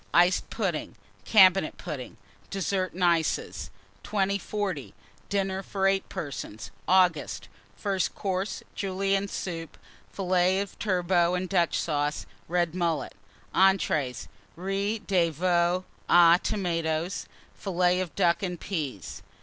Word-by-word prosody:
Iced 175 +2 +4
Pudding. - - -2 0.3
Cabinet 190 -5 +5
Pudding. 130 -5 -7 0.3
DESSERTS 190 -2 -1
AND 185 - -2
ICES. 155 - +1 0.3
2040. 200 -5 -2 0.3
DINNER 195 -1 0
FOR 195 0 -2
8 195 0 +2
PERSONS 130 -8 -6 0.2
(August). 180 - +2 0.3
FIRST 195 -2 -1
COURSE. 195 0 -2
Julienne 195 +1 0
Soup. 165 -5 -5 0.3
Fillets 185 0 +2
of 200 - -13
Turbot 180 -3 +2
and 185 +1 -3
Dutch 175 -3 +2
Sauce. 150 -2 -1 0.2
Red 175 -1 0
Mullet. 170 -5 -1 0.4
ENTREES. 155 - +2 0.3
Riz 195 +4 -2
de 180 -4 +3
Veau 175 +2 +1 0.3
aux 170 -1 +7
Tomates. 165 -2 -1 0.3
Fillets 180 -1 +1
of 180 -3 -5
Ducks 170 +4 +2
and 180 -2 -3
Peas. 145 - -4
180 Hz, 110 wpm, -27 LUFS, 165-195 Hz, 0.4 s, aux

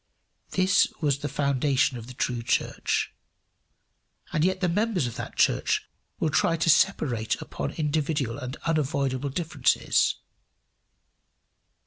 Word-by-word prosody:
This 190 +1 +3
was 145 -4 +1
the 145 - -3
foundation 140 -1 +1
of 115 -1 -8
the 125 - -10
true 120 -1 -1
church. 115 - 0 1.2
And 155 - +2
yet 185 +1 +1
the 180 - +1
members 200 - +1
of 120 - -4
that - - -6
church - - +2 0.3
will 155 - +1
try 165 +4 +2
to 165 0 +4
separate 135 - +1
upon 70 - -5
individual 145 -4 -1
and 130 +1 -5
unavoidable 140 -4 0
differences! 165 +4 +1
145 Hz, 120 wpm, -26 LUFS, 130-165 Hz, 1.2 s, to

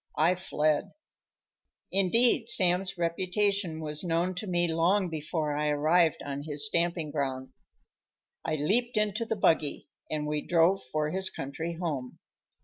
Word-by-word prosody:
I 165 +4 +4
fled. 155 -5 0 1.0
Indeed, 225 +5 +3
Sam's 185 -3 +2
reputation 180 +1 0
was 150 0 -5
known 175 +1 0
to 185 +4 -6
me 175 -1 +1
long 175 +4 +2
before 155 -1 -2
I 150 +1 0
arrived 155 +3 +2
on 140 0 -4
his 145 +2 -3
stamping 170 -5 0
ground. 130 -3 -3 0.9
I 155 - -1
leaped 225 - +1
into 210 +2 0
the 225 - -1
buggy, 160 -7 +1 0.2
and 150 -1 -2
we 150 0 -1
drove 175 +4 +3
for 155 0 0
his 190 +2 -1
country 150 +5 -5
home. 145 -8 -4
170 Hz, 140 wpm, -29 LUFS, 150-190 Hz, 1.0 s, I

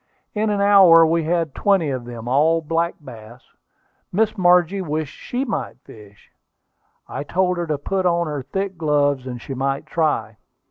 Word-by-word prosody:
In 215 0 0
an 205 -1 0
hour 190 -5 +7
we 165 0 0
had 165 -3 -1
twenty 190 -8 +1
of 130 -2 -4
them, 120 -1 -8
all 155 +6 +3
black 165 +2 -1
bass. 120 -4 -13 0.7
Miss 215 +3 +1
Margie 180 0 +3
wished 155 -3 -4
she 255 +2 -4
might 230 - -4
fish; 105 -2 -16 0.8
I - - -5
told 180 +3 0
her 170 -1 -3
to 150 -2 -1
put 185 +6 -1
on 170 0 +1
her 150 -3 -4
thick 190 +7 -4
gloves 145 -4 +1
and 125 -1 -6
she 135 - -7
might 135 +2 -2
try. 155 0 -1
165 Hz, 170 wpm, -21 LUFS, 140-180 Hz, 0.8 s, hour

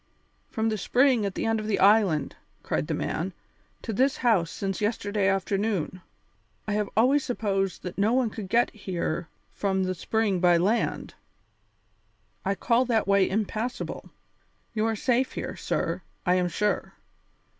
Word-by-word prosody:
"From 225 -1 0
the 215 -1 -2
spring 250 -4 +3
at 195 - -6
the - - -2
end 225 0 +1
of 215 - -5
the 210 - +1
island," 195 -8 +4 0.3
cried - - -1
the - - -1
man, - - -2 0.5
"to 225 - -3
this 265 +6 +2
house 210 -9 +2
since 195 +2 -4
yesterday 205 -2 0
afternoon! 195 -2 -1 0.7
I 210 - -1
have 210 -1 0
always 265 +5 +4
supposed 195 -6 -1
that 180 +1 -6
no 210 +3 +3
one 250 -3 +2
could 205 -4 -7
get 235 +3 +3
here 175 -5 -3 0.2
from 190 -1 0
the 185 0 -1
spring 200 +2 0
by 175 -1 +5
land. 205 +7 0 1.3
I 195 +1 0
call 235 +4 +2
that 230 -4 +1
way 200 -1 +4
impassable. 220 +4 -3 0.6
You 220 0 +1
are 225 - 0
safe 255 +3 +1
here, - - -4
sir, - - -2 0.2
I 180 - +4
am 180 -1 +2
sure. 210 +4 -1
210 Hz, 155 wpm, -27 LUFS, 190-225 Hz, 1.3 s, by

